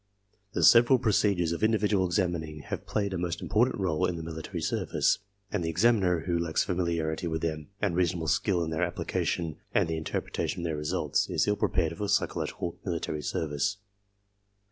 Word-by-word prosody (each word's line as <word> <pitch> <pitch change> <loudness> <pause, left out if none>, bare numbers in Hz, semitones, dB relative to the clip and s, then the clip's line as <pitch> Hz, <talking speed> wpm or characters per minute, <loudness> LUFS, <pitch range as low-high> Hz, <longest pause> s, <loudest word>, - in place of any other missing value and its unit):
The - - 0
several 120 +3 +7
procedures 100 -7 +2
of 85 - -3
individual 105 -3 +2
examining 85 -5 -1
have - - -6
played 100 -2 -1
a 90 - -2
most 85 0 -2
important 120 +4 +2
r61e 90 -3 +1
in 90 - -3
the 80 - -5
military 80 -1 -5
service, - - +1 0.3
and 100 -4 -1
the 80 - -1
examiner 95 -2 +3
who 85 0 -1
lacks 85 -1 +1
familiarity 85 -2 -1
with 80 -1 -2
them 75 -2 -2
and 100 -5 0
reasonable 85 -2 +1
skill 85 +3 +2
in 80 - -3
their 80 +2 -1
application 85 -2 -1 0.2
and 100 -4 +4
the 80 -1 -2
mterpretation - - -3
of 85 - -4
their 80 -2 -1
results 75 0 0
is - - +1
ill 105 - +3
prepared 85 -5 0
for 105 +2 -3
psychological 90 -3 -1
military 85 -4 -3
service. 75 +6 -1
85 Hz, 175 wpm, -28 LUFS, 80-100 Hz, 0.3 s, several